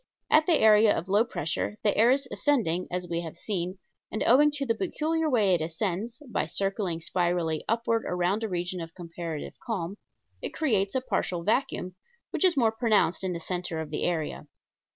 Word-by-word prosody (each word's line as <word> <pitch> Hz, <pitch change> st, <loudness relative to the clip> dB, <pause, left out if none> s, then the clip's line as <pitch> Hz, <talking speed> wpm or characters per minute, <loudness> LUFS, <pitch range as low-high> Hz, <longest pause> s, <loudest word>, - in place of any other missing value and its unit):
At 310 Hz, 0 st, +5 dB
the 335 Hz, -4 st, +5 dB
area 215 Hz, -1 st, +6 dB
of 175 Hz, -, -5 dB
low 205 Hz, +3 st, +4 dB
pressure 205 Hz, -2 st, -2 dB
the 205 Hz, -, +2 dB
air 225 Hz, +3 st, +5 dB
is 270 Hz, +1 st, +2 dB
ascending, 185 Hz, -, +1 dB
as 180 Hz, 0 st, -3 dB
we 170 Hz, 0 st, -2 dB
have 165 Hz, -1 st, -7 dB
seen, 185 Hz, -1 st, -3 dB, 0.3 s
and, 215 Hz, -, -1 dB
owing 285 Hz, +5 st, +6 dB
to 285 Hz, -1 st, -1 dB
the 230 Hz, -, +2 dB
peculiar 320 Hz, +3 st, -1 dB
way 210 Hz, -8 st, +3 dB
it 170 Hz, -, +2 dB
ascends 195 Hz, -, -3 dB
by 245 Hz, -, -1 dB
circling 195 Hz, -4 st, -1 dB
spirally 170 Hz, -2 st, 0 dB
upward 230 Hz, 0 st, +1 dB
around 180 Hz, +4 st, 0 dB
a 220 Hz, -, -2 dB
region 180 Hz, 0 st, -3 dB
of 165 Hz, 0 st, -8 dB
comparative 170 Hz, -3 st, -6 dB
calm 195 Hz, -4 st, -3 dB, 0.4 s
it -, -, -4 dB
creates 210 Hz, -10 st, +1 dB
a 260 Hz, -, +2 dB
partial 175 Hz, -8 st, -2 dB
vacuum, 215 Hz, -3 st, 0 dB, 0.4 s
which -, -, -1 dB
is 360 Hz, -5 st, +4 dB
more 230 Hz, -4 st, +4 dB
pronounced 220 Hz, -6 st, +2 dB
in 185 Hz, -1 st, -1 dB
the 170 Hz, -, -4 dB
center 175 Hz, -1 st, -3 dB
of 155 Hz, -2 st, -5 dB
the 150 Hz, -, -2 dB
area. 165 Hz, -3 st, -2 dB
195 Hz, 190 wpm, -27 LUFS, 175-230 Hz, 0.4 s, area